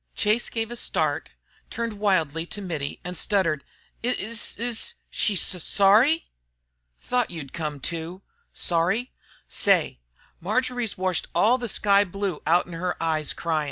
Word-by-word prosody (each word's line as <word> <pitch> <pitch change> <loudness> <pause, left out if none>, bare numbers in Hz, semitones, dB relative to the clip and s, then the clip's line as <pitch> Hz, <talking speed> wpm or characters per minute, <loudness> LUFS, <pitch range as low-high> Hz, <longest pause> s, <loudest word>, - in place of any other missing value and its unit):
Chase 215 +3 +2
gave 225 0 -3
a - - -4
start, - - 0 0.4
turned 230 -3 -4
wildly 165 -6 +1
to 205 - -6
Mittie, 160 -8 -4
and 180 0 -5
stuttered, 165 -5 +1 0.4
"Is 230 -2 -1
s - - -16
s 235 -1 -1 0.2
she 210 - +1
s 180 -1 +1
sorry?" 220 +11 +4 0.7
"Tho't 250 -2 +1
you'd 150 -6 -7
come 150 -4 -3
to. 170 +5 -4 0.3
Sorry! 180 +9 +1 0.4
Say, 60 - +2 0.4
Marjory's 240 +3 -1
washed 185 -2 0
all 245 +4 +4
the 240 -2 -3
sky 200 -1 +4
blue 195 -3 -3
out 175 +3 +4
'en 175 - -10
her 175 +2 -2
eyes 155 -3 0
cryin'. 165 -2 -1
195 Hz, 145 wpm, -25 LUFS, 165-225 Hz, 0.7 s, sorry